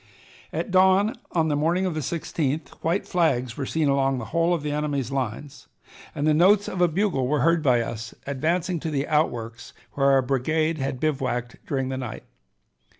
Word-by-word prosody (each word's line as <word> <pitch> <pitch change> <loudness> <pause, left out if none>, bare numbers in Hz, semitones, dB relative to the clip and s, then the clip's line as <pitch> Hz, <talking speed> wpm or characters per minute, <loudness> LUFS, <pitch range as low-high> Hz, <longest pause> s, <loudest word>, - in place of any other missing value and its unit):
At 205 - -3
dawn 190 +3 +4 0.2
on 160 -2 +2
the 145 - +1
morning 170 +6 +1
of 185 - -1
the 155 - -3
16th 150 -1 -2
white 170 +5 0
flags 130 -9 +1
were 135 - -4
seen 160 -2 0
along 135 -1 +2
the 120 - -5
whole 170 +1 +2
of 170 -4 0
the 150 - -2
enemy's 145 -4 -2
lines, 135 +2 -4 0.5
and 145 - -1
the 155 - +4
notes 195 +6 +4
of 180 - -3
a 175 - +6
bugle 165 -7 0
were 145 0 +1
heard 165 +3 +3
by 125 -5 +3
us 115 0 -6
advancing 165 +6 -1
to 160 - -4
the 140 -1 -1
outworks 120 -7 -1 0.2
where 140 -1 +2
our 135 -1 +4
brigade 155 +5 0
had 135 -1 -2
bivouacked 130 -5 -2
during 135 -2 -1
the 130 - -3
night. 125 -3 -6
150 Hz, 190 wpm, -25 LUFS, 130-165 Hz, 0.5 s, a